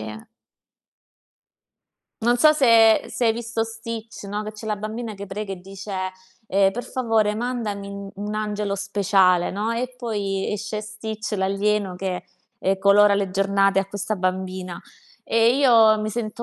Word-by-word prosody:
eh. 110 0 -7 2.0
Non 240 +2 +3
so 305 +5 +6
se 230 -6 +5
se 245 - -2
hai 225 - +4
visto 230 0 -2
Stitch, 225 -1 -7
no, 205 +2 -3
che 215 - -6
c'è 215 +1 -10
la 210 -1 -1
bambina 215 +2 -5
che 200 0 -7
prega 200 +1 -5
e 180 - -14
dice, 195 +2 -10 0.6
ehm: 195 0 +3
"Per 245 +5 -5
favore, 225 -4 +1
mandami 220 -4 -3
un 200 0 -7
un 205 +1 -5
angelo 210 -1 -2
speciale." 195 -3 +2
No, 210 +3 -2
e 250 +2 -3
poi 205 -5 -2
esce 210 +1 -4
Stitch, 215 +1 -6
l'alieno, 195 0 0
che, 185 -1 -3 0.3
ehm, 195 +1 +1
colora 200 +1 +5
le 200 -1 -1
giornate 195 0 +2
a 195 - +1
questa 205 +2 -3
bambina. 185 -1 -3 0.5
E 230 +3 +3
io 230 -6 +6
mi 215 0 -2
sento 230 +1 -4
210 Hz, 155 wpm, -23 LUFS, 195-225 Hz, 2.0 s, so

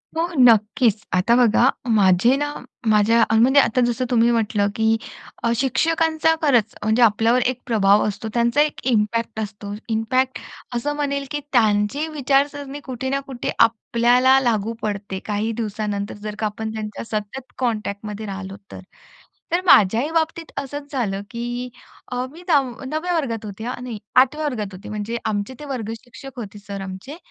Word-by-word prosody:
हो. 330 +1 +1
नक्कीच. 225 -1 +4
आता 190 +6 +3
बघा 245 +1 +4 0.2
माझे 200 +4 +4
ना 290 0 -2 0.4
माझ्या 220 +2 +4
म्हणजे 255 +5 +5
आता 255 -2 +3
जसं 240 +1 -1
तुम्ही 235 -1 +4
म्हटलं, 215 -3 +1
की 220 0 +2 0.5
अ, 235 - +2
शिक्षकांचा 320 +5 +2
खरंच 240 -8 +2
म्हणजे 220 +3 +2
आपल्यावर 225 +3 +3
एक 255 0 0
प्रभाव 210 -4 +3
असतो, 210 +2 -4
त्यांचा 235 +4 +2
एक 300 0 0
इम्पॅक्ट 225 0 0
असतो. 205 -1 -5 0.2
इम्पॅक्ट 250 +4 0 0.4
असं 290 +5 -1
म्हणेल, 280 -1 -2
की 295 - -1
त्यांची 220 +5 +2
विचारसरणी 285 -1 0
कुठे 260 0 -4
ना 275 +1 0
कुठे 255 -3 -4
आपल्याला 240 +3 +4
लागू 230 -4 0
पडते 200 -2 -3
काही 210 +1 -1
दिवसानंतर 210 -2 -3
जर 210 -1 -5
का 220 - 0
आपण 220 +1 -4
त्यांच्या 215 -1 -5
सतत 220 +4 -5
कॉन्टॅक्टमध्ये 215 -3 -3
राहिलो 195 -1 -6 0.2
तर. - - -8 0.7
तर 345 +2 +2
माझ्याही 225 - +5
बाबतीत 325 0 0
असंच 285 +1 -7
झालं, 210 -8 -2
की 240 +1 -4 0.4
अ, 250 0 -1
मी 335 - -13
दाव 285 -6 +3 0.2
9व्या 315 +6 -2
वर्गात 230 -9 -2
होते, 205 +2 -8
हां, 250 0 -5
नाही 235 -4 -6 0.2
8व्या 270 +4 +4
वर्गात 215 -8 -3
होते. 185 +3 -10
म्हणजे 215 +2 -3
आमचे 205 +3 -2
ते 300 - -8
वर्ग 245 -6 -4
शिक्षक 255 +1 -11
होते 210 -2 -8
सर 200 -1 -7
आमचे. 190 +9 -7
235 Hz, 160 wpm, -22 LUFS, 210-265 Hz, 0.7 s, म्हणजे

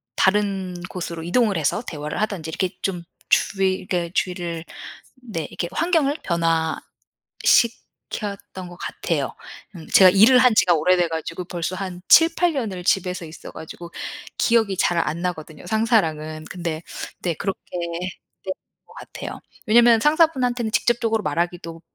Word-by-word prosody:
다른 195 -2 +1
곳으로 170 -3 -5
이동을 200 +4 +1
해서 155 +6 0
대화를 150 +1 -4
하든지 200 -7 -2
이렇게 185 +3 -1
좀 180 -3 -2 0.2
주의 190 -1 +1
그러니까 175 -2 -2
주의를 175 -2 -2 0.6
네. 205 -10 -4
이렇게 175 - -4
환경을 310 - +1
변화시켰던 185 +4 -1
것 175 - -11
같아요. - - -3 0.4
음 160 - -10
제가 185 -1 +8
일을 220 +7 +7
한 250 -2 +5
지가 180 -3 +5
오래돼 175 +3 +3
가지고 165 +2 -4
벌써 175 +1 -4
한 185 -2 -6
7-8 330 +1 +6
년을 210 -9 -3
집에서 180 -2 0
있어 155 - -11
가지고 170 +2 -9 0.5
기억이 220 -5 +2
잘 175 -1 +2
안 165 0 -1
나거든요 160 -4 -5
상사랑은. 160 -8 0
근데 170 -3 -4 0.4
네. 175 -2 0
그렇게 195 +4 -3 0.9
했던 190 - 0 0.3
것 - - -18
같아요. - - -8 0.3
왜냐면 230 +1 +6
상사분한테는 260 -6 +2
직접적으로 225 -2 +1
말하기도 170 +1 -3
185 Hz, 315 characters per minute, -22 LUFS, 170-220 Hz, 0.9 s, 제가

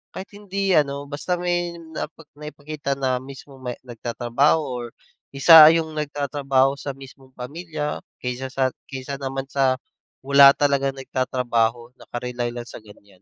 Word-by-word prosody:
kahit 190 - -7
hindi 195 -1 -2
ano, 140 -1 0
basta 165 +5 -2
may 175 -1 -1
nai 160 -2 -6 0.3
naipakita 150 -2 -5
na 130 -2 -1
mismo 135 +1 -12
may 125 -1 -4
nagtatrabaho 120 +4 0
or 125 -3 -5 0.5
isa 155 +2 +10
yung 160 -1 -1
nagtatrabaho 140 -2 0
sa 140 -2 -5
mismong 135 -1 -15
pamilya 150 +3 -5 0.2
kaysa 125 +1 -3
sa 130 -1 0 0.2
kaysa 135 0 -6
naman 135 -1 -3
sa 135 -2 +2 0.5
wala 140 0 +9
talagang 140 -1 +1
nagtatrabaho, 120 -3 -1
naka-rely 120 -1 -5
lang 120 0 -7
sa - - -10
ganyan, 100 -3 -19
135 Hz, 135 wpm, -23 LUFS, 125-150 Hz, 0.5 s, isa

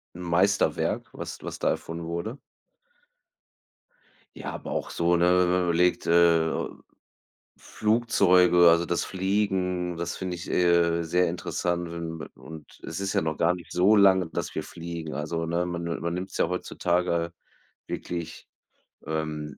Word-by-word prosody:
'N 90 - -8
Meisterwerk, 90 +3 +1
was - - -7
was - - -6
da - - +1
erfunden 85 0 -5
wurde. 85 +10 -4 2.0
Ja, - - -6
aber - - -7
auch - - -3
so, 85 +1 +1
ne? 85 - +3
Wenn 90 0 +4
man 90 0 +2
überlegt, 90 +1 +2
äh, 85 -1 +4 1.1
Flugzeuge, 90 -6 +4
also, 85 +1 +2
das 85 - 0
Fliegen, 95 -2 -1
das 85 0 -4
finde 95 -1 -4
ich, 85 - -8
äh, 85 -1 +3
sehr 90 +2 +2
interessant. 85 0 -2
Und 85 -1 -6
und 80 -2 -12
es - - -5
ist 100 -1 -2
ja - - +2
noch 80 -1 -2
gar 85 +2 +3
nicht 90 -2 -10
so 95 +5 +4
lange, 95 -4 +5
dass 80 - -4
wir - - -2
fliegen, 85 -2 -7
also, 80 +2 -3
ne? 85 +2 -1
Man 85 -1 -4
ni 85 0 -3
man 85 +1 -2
nimmt's 95 +2 -5
ja - - +3
heutzutage 85 -1 -1 0.5
wirklich, 85 -1 -6 0.6
ähm, 75 -1 -4
85 Hz, 150 wpm, -26 LUFS, 85-90 Hz, 2.0 s, lange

